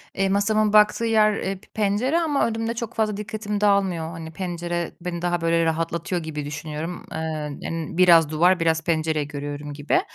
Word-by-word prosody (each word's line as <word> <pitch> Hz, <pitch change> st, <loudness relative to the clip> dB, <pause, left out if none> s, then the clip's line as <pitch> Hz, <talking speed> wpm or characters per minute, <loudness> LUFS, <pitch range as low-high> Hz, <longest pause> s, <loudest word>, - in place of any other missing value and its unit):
eee, 195 Hz, 0 st, +1 dB
masamın 210 Hz, +1 st, +2 dB
baktığı 210 Hz, +2 st, +5 dB
yer, 215 Hz, -2 st, +4 dB
eee, 195 Hz, +1 st, -2 dB
p -, -, -22 dB
pencere 220 Hz, +10 st, +1 dB
ama 300 Hz, -7 st, +1 dB
önümde 225 Hz, 0 st, -2 dB
çok 235 Hz, -1 st, -5 dB
fazla 215 Hz, -2 st, 0 dB
dikkatim 210 Hz, -1 st, -4 dB
dağılmıyor. 190 Hz, -5 st, +2 dB
Hani, 165 Hz, -1 st, -8 dB
pencere 175 Hz, -1 st, -3 dB
beni 170 Hz, -1 st, -4 dB
daha 175 Hz, -1 st, 0 dB
böyle 165 Hz, 0 st, +2 dB
rahatlatıyor 165 Hz, +1 st, -1 dB
gibi 150 Hz, -2 st, -5 dB
düşünüyorum. 155 Hz, +3 st, -5 dB
Eee, -, -, -4 dB, 0.4 s
yani 165 Hz, -2 st, -4 dB
biraz 170 Hz, -4 st, +6 dB
duvar, 175 Hz, +4 st, +3 dB
biraz 160 Hz, -1 st, +1 dB
pencere 160 Hz, -2 st, 0 dB
görüyorum 145 Hz, 0 st, -6 dB
gibi. 145 Hz, -, +1 dB
175 Hz, 170 wpm, -23 LUFS, 160-210 Hz, 0.4 s, biraz